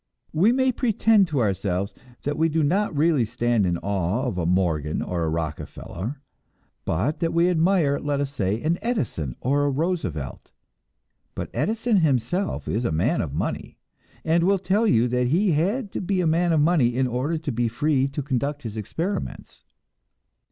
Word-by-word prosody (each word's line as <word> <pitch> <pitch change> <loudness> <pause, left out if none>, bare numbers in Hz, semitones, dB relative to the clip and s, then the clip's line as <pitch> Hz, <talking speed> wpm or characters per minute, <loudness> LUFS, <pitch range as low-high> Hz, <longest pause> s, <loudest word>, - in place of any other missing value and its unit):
We 190 +9 +4
may 260 +1 +2
pretend 225 -4 +3
to 145 -5 0
ourselves 100 -2 -1 0.3
that 145 +1 -1
we 160 +1 +2
do 160 0 +1
not 180 +2 +1
really 155 -4 +3
stand 120 -2 +1
in 85 -1 0
awe 100 +5 -1
of 110 -8 -2
a 85 - 0
Morgan 80 -5 +1
or 85 -2 -2
a 80 - 0
Rockefeller, 85 - -5 0.7
but 110 - -1
that 165 - 0
we 170 +2 +3
admire, 165 -4 +2
let 145 -1 -1
us 140 -1 -2
say, 105 -3 -1
an 165 +3 +1
Edison 115 - -2
or 140 +3 +1
a - - +2
Roosevelt. 135 - -3 0.8
But - - -5
Edison 225 0 +1
himself 160 - 0
is 115 +4 -1
a 115 - 0
man 80 +1 +1
of - - -4
money, - - -3 0.5
and 165 +1 +3
will 195 +2 +3
tell 195 +5 +1
you 120 - +3
that 125 0 +1
he 180 +8 +2
had 195 - 0
to - - -3
be 190 0 0
a 180 - +1
man 170 +2 +2
of 160 -2 +3
money 145 -7 +3
in 130 +1 +2
order 130 +7 -1
to 155 -2 -4
be 120 0 0
free 135 +3 +1
to 140 +1 -4
conduct 140 +2 -2
his 110 -3 -6
experiments. 165 - -4
145 Hz, 180 wpm, -24 LUFS, 110-175 Hz, 0.8 s, We